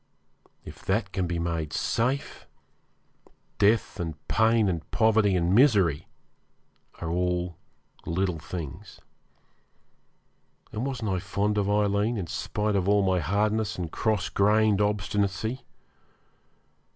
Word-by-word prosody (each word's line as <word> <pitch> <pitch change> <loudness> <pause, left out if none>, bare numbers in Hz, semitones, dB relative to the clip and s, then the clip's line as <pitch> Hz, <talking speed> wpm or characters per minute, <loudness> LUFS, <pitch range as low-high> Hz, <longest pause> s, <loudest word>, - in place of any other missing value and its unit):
If - - -11
that 95 0 0
can 95 -2 -1
be 85 0 -2
made 85 -2 -2
safe, 130 +5 -1 1.1
death 105 0 +2
and 80 -3 -3
pain 110 0 +3
and 85 -4 -3
poverty 110 -3 +3
and 90 0 +1
misery 100 - +4 0.9
are 80 - -4
all 90 0 -1 0.5
little 90 0 -1
things. 85 +4 -8 1.7
And 120 +5 -3
wasn't 115 -6 -3
I 95 - 0
fond 100 +2 -1
of 100 0 0
Aileen, 105 +2 +1
in 95 - -3
spite 105 +4 -2
of 95 0 +1
all 100 0 +4
my 95 -1 +2
hardness 105 +4 0
and 85 -3 -4
cross 110 -3 0
grained 105 0 +3
obstinacy? 105 +3 -1
100 Hz, 115 wpm, -27 LUFS, 90-110 Hz, 1.7 s, misery